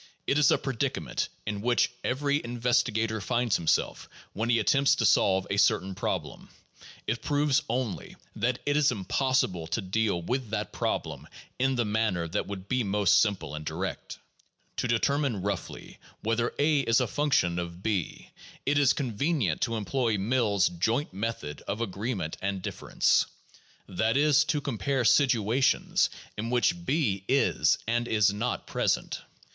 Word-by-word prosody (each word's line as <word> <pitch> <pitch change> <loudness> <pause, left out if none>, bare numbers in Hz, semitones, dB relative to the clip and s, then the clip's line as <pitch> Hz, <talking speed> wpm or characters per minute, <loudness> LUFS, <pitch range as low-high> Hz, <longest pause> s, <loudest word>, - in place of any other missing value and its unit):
It 140 - +2
is 145 - +5
a - - +4
predicament 130 -5 -2 0.2
in 105 -1 -3
which 120 +1 +2
every 140 +2 0
investigator 115 -2 0
finds 120 +1 0
himself 80 - 0 0.2
when 110 +3 -2
he 120 - +4
attempts 140 +5 +3
to 115 - 0
solve 95 -2 +3
a 100 - 0
certain 95 -1 +2
problem. - - -4 0.6
It 115 +1 -2
proves 145 -1 +2
only 120 -4 -3 0.2
that 120 +3 0
it 145 - +1
is 150 -1 +4
impos 130 +5 +1
sible 85 -4 -7
to 110 - -1
deal 100 -1 0
with 120 +7 -3
that 110 - -3
problem - - -3 0.3
in 130 +1 +2
the 120 -2 +1
manner 105 -5 0
that 80 - -2
would 100 -1 -7
be 130 +1 0
most 105 0 +3
simple 100 -9 -1
and 75 0 -5
direct. - - -5 0.6
To - - 0
determine 120 -2 0
roughly 100 -3 -5 0.2
whether 115 +2 0
a 150 0 +3
is 115 -3 +3
a 125 - +1
function 115 -12 +1
of 85 +1 -7
o, 105 -6 +1 0.6
it 145 +1 +2
is 140 -2 +4
convenient 130 - -1
to 115 - 0
employ 115 0 0
Mill's 105 -2 +2
"Joint 110 - -1
Method 95 -8 -4
of 105 - -2
Agreement 105 -5 -3
and 100 -1 -2
Difference," - - +1 0.6
that 110 +6 0
is, 150 0 +4
to 150 -2 0
compare 130 0 -1
situations 125 0 +3 0.3
in 115 +2 -2
which 170 +8 +1
b 130 - 0
is 135 +1 +3
and 120 +1 0
is 105 -3 +3
not 115 +4 -2
present. - - -1
115 Hz, 155 wpm, -28 LUFS, 100-130 Hz, 0.6 s, is